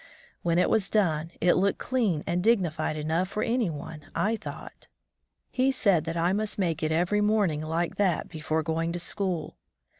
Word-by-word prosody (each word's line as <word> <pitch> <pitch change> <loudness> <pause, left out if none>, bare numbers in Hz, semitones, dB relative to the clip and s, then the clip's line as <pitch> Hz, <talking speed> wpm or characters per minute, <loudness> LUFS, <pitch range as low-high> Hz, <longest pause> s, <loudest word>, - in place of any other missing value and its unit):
When 170 -1 +1
it 180 - +4
was 200 -3 +2
done 165 -7 +1
it 175 +1 +5
looked 195 +2 +2
clean 220 -12 0
and 175 +1 -1
dignified 175 -9 +1
enough 160 +5 0
for 210 - -2
any 230 -4 +1
one, 150 -1 -8
I 220 +2 +1
thought. - - -9 0.6
He 260 +1 +2
said 200 -11 +2
that 165 +1 -3
I 170 +2 +2
must 215 +1 -2
make 170 -6 0
it 155 0 0
every 175 +6 +2
morning 205 -8 +2
like 160 +2 -2
that 190 -5 +1
before 155 -1 -2
going 165 +1 -1
to 175 - -3
school. 180 -2 -3
175 Hz, 180 wpm, -27 LUFS, 160-205 Hz, 0.6 s, it